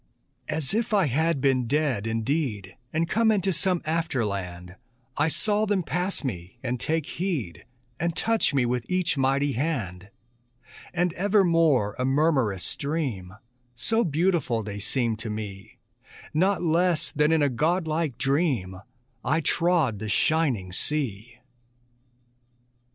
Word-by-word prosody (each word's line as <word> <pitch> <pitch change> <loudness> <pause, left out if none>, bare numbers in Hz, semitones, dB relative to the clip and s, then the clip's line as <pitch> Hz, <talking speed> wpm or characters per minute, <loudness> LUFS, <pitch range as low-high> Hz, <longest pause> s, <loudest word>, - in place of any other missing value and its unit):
As 155 -1 -1
if 220 0 0
I 195 -3 +4
had 155 +3 +1
been 130 -3 +2
dead 135 -6 0
indeed, 115 - -2 0.2
And 165 +1 0
come 225 +5 +2
into 195 -3 +2
some 180 +1 +1
after 160 -6 0
land, 90 -3 -5 0.4
I 150 - +2
saw 210 +6 +1
them 200 -3 +1
pass 180 +4 -2
me, 95 -4 -5
and 125 -1 -2
take 160 +2 -1
heed, 155 - -4 0.3
And 170 0 -1
touch 225 -1 +2
me 135 -4 +2
with 120 -1 -2
each 185 -3 +1
mighty 135 +1 +1
hand; 110 - -3 0.8
And 175 -1 0
evermore 165 - +3
a - - +1
murmurous 135 - +2
stream, 130 - -3 0.4
So 225 - +1
beautiful 160 - +1
they 100 -1 -6
seemed 115 +1 -1
to 115 -1 -5
me, 105 -1 -7 0.6
Not 185 +4 +2
less 170 0 +2
than 150 +1 +2
in 160 -2 +3
a - - +4
godlike 155 +1 0
dream 130 - 0 0.4
I 140 +6 +2
trod 165 - +1
the 110 0 -4
shining 125 - +1
sea. 120 -1 -2
145 Hz, 135 wpm, -26 LUFS, 115-170 Hz, 0.8 s, I